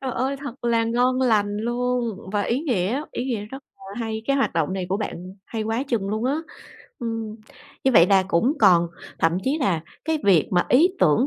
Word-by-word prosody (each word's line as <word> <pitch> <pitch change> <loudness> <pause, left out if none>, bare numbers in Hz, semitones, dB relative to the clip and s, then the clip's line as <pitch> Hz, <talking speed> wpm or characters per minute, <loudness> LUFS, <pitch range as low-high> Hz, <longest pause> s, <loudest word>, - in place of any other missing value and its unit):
Trời 265 - -3
ơi! 265 +4 -1
Thật 275 -3 -9
là 230 -1 +2
ngon 250 +3 +1
lành 210 -5 +2
luôn 240 -1 -1
và 205 -1 +1
ý 240 +6 0
nghĩa, 245 - 0
ý 245 - -3
nghĩa 235 -6 -2
rất 270 +5 -9 0.3
là 195 - -8
hay, 220 -1 -3
cái 275 - +2
hoạt 270 - +1
động 165 +1 0
này 190 -1 -3
của 190 - 0
bạn 215 - -4 0.3
hay 225 -2 -4
quá 225 +3 -1
chừng 215 -6 -1
luôn 215 +2 -2
á. 270 +3 +1 0.6
Ừm, 225 -2 -4 0.5
như 265 - +3
vậy 170 -6 +7
là 195 0 +4
cũng 195 +10 +2
còn 180 -5 +6 0.3
thậm 165 +2 +2
chí 280 +4 +1
là 185 - +1 0.2
cái 320 +1 0
việc 185 -6 +4
mà 175 -1 +2
ý 300 +8 +5
tưởng 180 - +4
225 Hz, 215 wpm, -23 LUFS, 195-255 Hz, 0.6 s, vậy